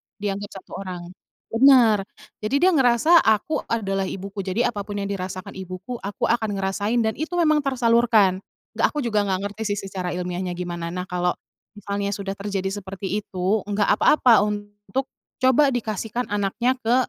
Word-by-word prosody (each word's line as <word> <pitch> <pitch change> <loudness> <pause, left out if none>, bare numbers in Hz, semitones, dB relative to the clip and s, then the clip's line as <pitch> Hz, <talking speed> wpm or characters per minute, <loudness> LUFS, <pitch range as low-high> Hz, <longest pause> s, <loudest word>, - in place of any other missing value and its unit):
dianggap 200 -1 -5
1 - - -24
orang, 185 -3 -6 0.5
bener 230 -5 +5 0.3
jadi 215 +5 -1
dia 375 - +6
ngerasa 270 +4 +5
aku 220 +7 +2
adalah 195 -4 -1
ibuku 195 +2 -6
jadi 195 +6 0
apa 205 -3 -6
pun 205 - -5
yang 200 - -3
dirasakan 185 +1 -5
ibuku 190 +6 -7
aku 200 +1 -6
akan 220 -3 0
ngerasain 200 +4 0
dan 220 - +1
itu 320 +3 -3
memang 310 -3 +3
tersalurkan, 235 -7 +3 0.4
nggak - - +5
aku 295 -3 -3
juga 210 -3 +1
nggak 190 -1 0
ngerti 205 -1 -3
sih - - -4
secara 185 -2 -4
ilmiahnya 180 0 -3
gimana 175 -1 -4
nah 180 +2 -4
kalo, 180 -1 -1 0.4
misalnya 200 0 -3
sudah 195 -1 -4
terjadi 195 -1 -2
seperti 195 +1 -4
itu, 195 +1 -1
nggak 205 0 +1
apa-apa 250 -6 +5
untuk 205 +4 -4 0.3
coba 260 +3 +5
dikasihkan 225 0 -3
anaknya 225 +6 0
ke 240 0 +2
205 Hz, 160 wpm, -23 LUFS, 190-235 Hz, 0.5 s, dia